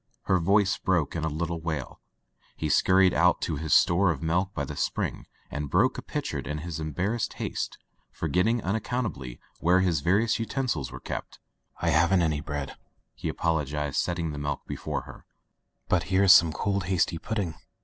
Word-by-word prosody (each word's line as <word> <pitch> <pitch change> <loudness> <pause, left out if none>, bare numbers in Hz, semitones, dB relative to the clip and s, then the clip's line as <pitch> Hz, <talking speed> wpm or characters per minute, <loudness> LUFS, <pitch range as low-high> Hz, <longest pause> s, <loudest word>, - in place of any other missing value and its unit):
'* - - -41
Her 95 - +2
voice 100 +3 +2
broke 90 -6 0
in 80 - -2
a - - +1
little 80 +2 -3
wail. 80 -5 -4 0.6
He 80 - -2
scur 95 +6 +4
ried 95 - +4
out 90 +1 +4
to 80 - -1
his 80 +1 -4
store 90 +2 +5
of 80 -3 -2
milk 90 +4 +1
by 70 - -1
the - - -7
spring, - - -2 0.2
and 75 0 -4
broke - - +2
a - - -6
pitcher - - -3
in 75 - -4
his 85 +1 -5
embarrassed 90 - -2
haste, - - -4 0.3
forgetting 90 +9 0
unaccountably 100 - -3 0.2
where 90 +2 +4
his 85 -6 +1
various 105 +10 +2
utensils 115 - -2
were - - -8
kept. - - -6 0.5
"I 85 - +3
haven't 85 +3 +4
any 75 -2 0
bread," 75 -2 -5 0.4
he - - -4
apologized, 75 -3 -1
set 90 - +1
ting 85 -2 -2
the 75 - -5
milk 75 0 -3
before - - -4
her, - - -12 0.6
"but 90 -2 +1
here 95 +1 +2
is 95 0 +9
some 85 -5 +6
cold 100 +3 -1
hasty 85 -2 +1
pudding." 100 -4 -2
85 Hz, 185 wpm, -27 LUFS, 75-95 Hz, 0.6 s, is